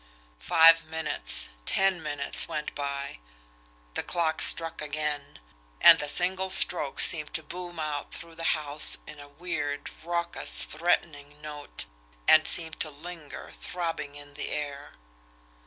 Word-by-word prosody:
Five 165 - +6
minutes, 150 - -4 0.2
ten 190 -3 +2
minutes 145 -2 -2
went 150 0 -4
by. 140 - -5 0.7
The - - -2
clock 165 -2 -1
struck 165 -1 +5
again 150 -1 -4 0.4
and - - +9
the 150 - -3
single 185 +3 0
stroke 160 -6 0
seemed 155 -3 +3
to 160 - -2
boom 175 +1 -8
out 150 -2 -4
through 165 0 -10
the 165 0 -6
house 150 0 +3
in 150 - -11
a 145 - -11
weird, 145 -2 -4
raucous, 170 0 +1
threatening 150 -3 -2
note, 150 - -6 0.4
and 155 0 +7
seemed 160 -2 +2
to 155 - -1
linger, 160 +1 -9
throbbing 165 -5 -4
in 145 0 -12
the - - -5
air. 145 -1 -5
155 Hz, 135 wpm, -27 LUFS, 145-165 Hz, 0.7 s, and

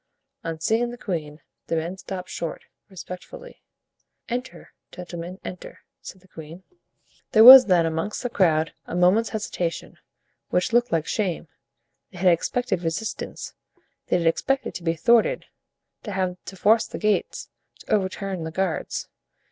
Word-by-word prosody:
On 165 -1 -5
seeing 225 +8 +1
the 240 - -8
queen, 160 -8 -5 0.3
the - - -1
men 165 +3 -3
stopped 190 -1 -7
short, 165 -2 -5 0.3
respectfully. 195 - -10 0.7
"Enter, 250 +2 -6 0.2
gentlemen, 180 0 -8
enter," 180 - -9 0.2
said 190 - -11
the 190 - -23
queen. 165 +2 -11 0.7
There 220 - +7
was 255 0 +12
then 175 -3 +4
amongst 165 +9 -3
that 245 - -4
crowd 160 -4 +2
a - - -5
moment's 185 +6 +3
hesitation, 180 -6 -4 0.5
which 180 +5 0
looked 240 +1 +3
like 160 -2 0
shame. 180 -6 -2 0.6
They 185 - -13
had 180 0 +4
expected 245 +3 -1
resistance, 170 +6 -4 0.5
they - - +2
had 170 - -2
expected 265 +11 0
to 175 - -7
be 165 -1 0
thwarted, 235 - +2 0.6
to 210 - -6
have 185 -1 -1
to 190 - -8
force 215 +4 +3
the - - -7
gates, 210 -1 -1 0.3
to - - -4
overturn 190 -2 -2
the 160 - -4
guards. 180 0 -3
185 Hz, 150 wpm, -24 LUFS, 165-220 Hz, 0.7 s, was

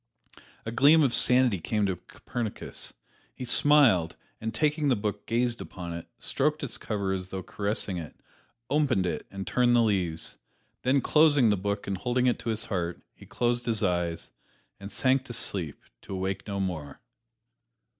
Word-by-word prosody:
A 110 - -3
gleam 145 +6 +6
of 130 -4 +2
sanity 125 -6 +3
came 105 +5 0
to 95 -2 0
Copernicus. 115 +3 -5 0.4
He 130 - -6
smiled, 120 - +4 0.2
and 110 0 -3
taking 150 +1 +1
the 130 - +4
book 105 -1 -3
gazed 120 0 0
upon 85 -2 -7
it, 85 0 -7
stroked 150 +5 0
its 140 - -3
cover 100 -3 -2
as 95 -1 -4
though 95 -1 -5
caressing 100 -2 -2
it, 80 - -8 0.5
opened 140 -10 +2
it 90 - -3
and 95 -1 -6
turned 120 -1 +3
the 120 - +5
leaves. 90 -7 -1 0.4
Then 130 +2 +3
closing 145 -7 +5
the - - +3
book 100 +2 -2
and 95 -2 -3
holding 125 +2 +1
it 125 - +2
to - - -4
his 110 0 -1
heart, 90 -3 -3
he - - -16
closed 120 0 0
his 110 -2 0
eyes, 85 -3 -1 0.5
and 100 +1 -8
sank 130 +5 +2
to 120 - -7
sleep, 90 -9 -3 0.2
to 95 - -6
awake 95 +2 -3
no 100 -1 -3
more. 80 -7 -4
110 Hz, 170 wpm, -28 LUFS, 95-125 Hz, 0.5 s, gleam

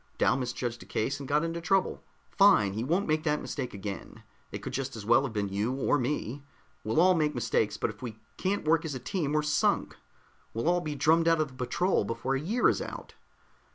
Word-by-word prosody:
Dal - - +3
misjudged 120 -2 -3
a - - -12
case 135 +6 -1
and 140 - -7
got 150 +2 +2
in 165 0 -2
trouble. 185 +3 +1 0.3
Fine, 190 - +5
he 110 +3 -2
won't 175 +10 0
make 155 0 +1
that 150 -2 +1
mistake 125 - -4
again. 100 0 -7 0.3
It - - -6
could - - -5
just 135 -2 -3
as 105 -2 -7
well 120 +4 +5
have 135 -5 -4
been 100 -2 -1
you, 105 +6 -1
or 140 +2 +1
me. 130 0 -2 0.4
We'll 110 +7 +1
all 185 +2 +6
make 155 -3 +1
mistakes, 115 -2 0
but - - -1
if 105 - -17
we 115 -4 -6 0.2
can't 195 -3 -2
work 165 +1 +4
as 155 -4 -4
a - - -4
team, 155 - -2
we're 150 0 +2
sunk. 150 0 +1 0.6
We'll 115 +7 -1
all 175 0 +3
be 155 -3 -4
drummed 165 +3 +3
out 165 -1 +4
of 155 -2 0
the - - -16
patrol 135 - 0
before 115 +5 -2
a 135 - 0
year 220 +10 +2
is - - +2
out." - - -7
140 Hz, 225 wpm, -29 LUFS, 115-165 Hz, 0.6 s, all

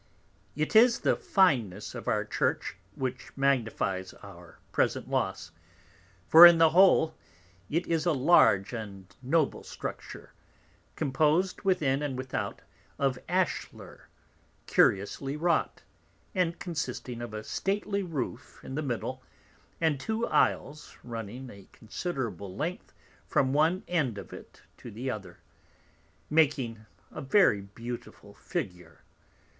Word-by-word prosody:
It 155 +7 -2
is 235 +2 +6
the - - +2
fineness 120 - +1
of - - -8
our - - +1
Church - - -1 0.2
which 130 -1 -4
magnifies 110 -8 0
our - - -13
present - - 0
loss, 85 +1 -2 0.8
for 165 +2 +9
in 170 -1 +6
the 165 -1 +5
whole 175 -3 +5 0.6
it 165 +4 0
is 165 0 0
a - - +4
large 130 - +4
and 100 -4 -8
noble 140 +3 +1
structure, - - -8 0.6
compos'd 155 +5 +1
within 155 -9 +1
and 140 -3 -3
without 130 0 -4 0.3
of 135 -2 0
Ashler 185 -2 -3 0.6
curiously 135 +8 +1
wrought, 170 +2 0 0.5
and 180 -3 0
consisting 130 -7 -5
of 120 - -6
a 110 - -5
stately 200 - -2
Roof 145 -9 -5
in - - -8
the 150 - -2
middle, 130 -1 -4 0.6
and 160 -4 +1
two 220 +7 -2
Isles 150 - 0
runing 120 +2 -7
a 100 -1 -14
considerable 110 - -5
length 165 - -4 0.4
from 130 -1 +1
one 160 +6 +2
end 145 -11 0
of 100 - -9
it - - -13
to - - -10
the 125 +5 -4
other, 95 -6 -8 0.9
makes 155 -2 +4
a 110 -9 -8
very 135 - +4
beautiful 115 +5 -9
Figure. 90 -2 -6
135 Hz, 120 wpm, -29 LUFS, 110-165 Hz, 0.9 s, for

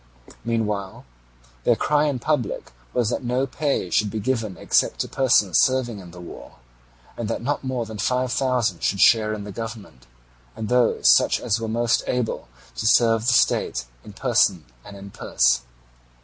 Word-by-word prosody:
Meanwhile 105 -4 -3 0.6
their - - +3
cry 150 0 +1
in 145 -3 0
public 125 -3 -2 0.2
was 120 -2 0
that - - -3
no 125 +2 0
pay 135 - -2
should 105 - +2
be 110 - -4
given 110 -4 -2
except - - +1
to - - -3
persons 110 -8 +3
serving 130 -5 0
in 90 -2 -11
the 90 +1 -12
war, 85 - -11 0.6
and 115 -3 -4
that - - -3
not 145 +3 -2
more 130 -3 -2
than 110 -1 -9
five 125 +4 0
thousand 125 -10 0
should 100 - 0
share 110 +3 +5
in 105 -1 -4
the 105 - -8
government, 105 - -8 0.5
and 110 - -5
those 125 -1 +2
such - - +5
as 115 -2 -1
were 115 - -3
most 115 +1 +1
able 125 - -2 0.3
to 110 - -1
serve 115 0 +3
the 125 - +4
state - - +1 0.2
in - - -12
person - - +1 0.2
and 100 - -11
in 100 0 -11
purse. - - +1
115 Hz, 175 wpm, -23 LUFS, 105-125 Hz, 0.6 s, share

